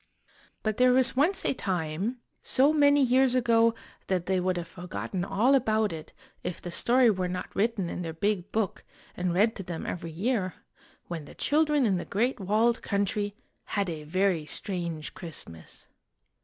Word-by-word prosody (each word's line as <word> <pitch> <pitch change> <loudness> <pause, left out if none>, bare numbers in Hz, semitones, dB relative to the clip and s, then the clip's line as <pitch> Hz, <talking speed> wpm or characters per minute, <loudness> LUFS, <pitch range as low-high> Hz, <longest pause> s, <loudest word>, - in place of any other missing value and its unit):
But 215 -1 -1
there 250 0 +5
was 255 0 +4
once 320 +9 +2
a - - +3
time, 190 +3 -2 0.2
so 280 +4 +3
many 285 -2 +5
years 255 0 +3
ago 230 -2 +4 0.3
that 185 -2 0
they 190 0 +1
would 185 0 0
have 170 -1 -4
forgotten 180 +1 -5
all 220 +7 +2
about 220 -6 +2
it 155 -1 -8 0.3
if 180 -1 -4
the 175 - -7
story 240 +5 +4
were 185 -2 -1
not 180 0 -5
written 205 -3 +1
in 175 - -4
their 165 -2 -4
Big 200 +3 -1
Book 215 -4 -1 0.3
and 180 0 -1
read 210 +6 +3
to - - -4
them 175 -2 -5
every 170 -1 -4
year, 185 +2 -1 0.5
when 165 -4 -5
the - - -13
children 300 -2 +2
in 195 -4 +2
The 175 - -4
Great 240 +5 0
Walled 215 +5 +2
Country 205 0 -1 0.4
had 200 -3 +1
a 155 -2 -6
very 185 +1 +1
strange 170 -1 -3
Christmas. 110 - -9
200 Hz, 170 wpm, -28 LUFS, 175-240 Hz, 0.5 s, there